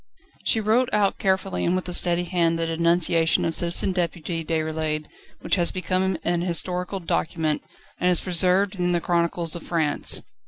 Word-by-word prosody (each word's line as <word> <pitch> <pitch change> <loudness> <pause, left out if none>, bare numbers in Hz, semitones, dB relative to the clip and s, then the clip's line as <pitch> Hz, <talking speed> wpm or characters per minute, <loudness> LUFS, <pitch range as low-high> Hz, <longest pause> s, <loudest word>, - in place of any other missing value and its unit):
She 225 - +2
wrote 225 +4 +2
out 205 -2 +1
carefully 190 0 0
and 175 - +1
with 185 0 -3
a 180 - -3
steady 175 0 +3
hand 170 -2 +1
the 165 - -1
denunciation 165 0 +2
of 165 - 0
Citizen 175 +3 -1
Deputy 170 -2 -2
Déroulède 155 -1 -2 0.4
which - - +1
has 175 -1 +2
become 185 0 -1
an 175 0 0
historical 180 +2 -2
document, 160 -3 -1 0.4
and 180 - +2
is 180 - +4
preserved 185 +2 +2
in 180 0 0
the 175 - +2
chronicles 170 -1 0
of 170 - -6
France. 160 -4 0
175 Hz, 165 wpm, -24 LUFS, 165-185 Hz, 0.4 s, is